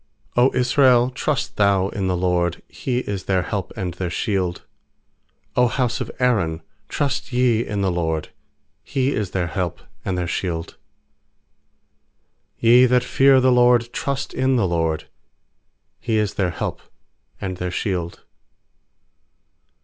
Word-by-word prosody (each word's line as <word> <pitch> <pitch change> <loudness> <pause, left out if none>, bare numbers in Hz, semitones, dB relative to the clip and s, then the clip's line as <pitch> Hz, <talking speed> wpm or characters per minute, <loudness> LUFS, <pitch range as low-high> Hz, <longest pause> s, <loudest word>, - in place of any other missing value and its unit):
90 125 +2 +3
Israel, 125 -1 +4
trust 140 +1 -2
thou 100 -2 +3
in 100 -2 -3
the 90 -1 0
LORD! 90 -1 0
He 125 -1 -2
is 100 -5 -5
their 95 -2 +1
help 100 0 -4
and 90 -2 -3
their 90 0 -3
shield! 90 -2 -2 0.9
100 125 -2 +2
house 125 -2 0
of - - -4
Aaron, 90 -11 +1 0.3
trust 135 -1 -2
ye 120 -2 +2
in 105 -3 -3
the 95 -1 +1
LORD! 80 -3 -2 0.5
He 135 0 -1
is 105 -3 -2
their 90 -2 -1
help 85 0 -3 0.2
and 95 -1 -2
their 90 - -1
shield! 85 -2 -3 1.9
nYe 120 +2 +7
that 125 0 +3
fear 135 +1 +4
the 130 0 +4
LORD, 120 -1 +4
trust 140 -1 -3
in 130 0 +1
the 110 -6 +2
LORD! 80 -2 -1 0.9
He 110 - -1
is 105 -1 0
their 95 -3 0
help 85 - -4 0.6
and 95 -2 -4
their 90 0 -3
shield. 90 -2 -3
100 Hz, 140 wpm, -22 LUFS, 90-125 Hz, 1.9 s, nYe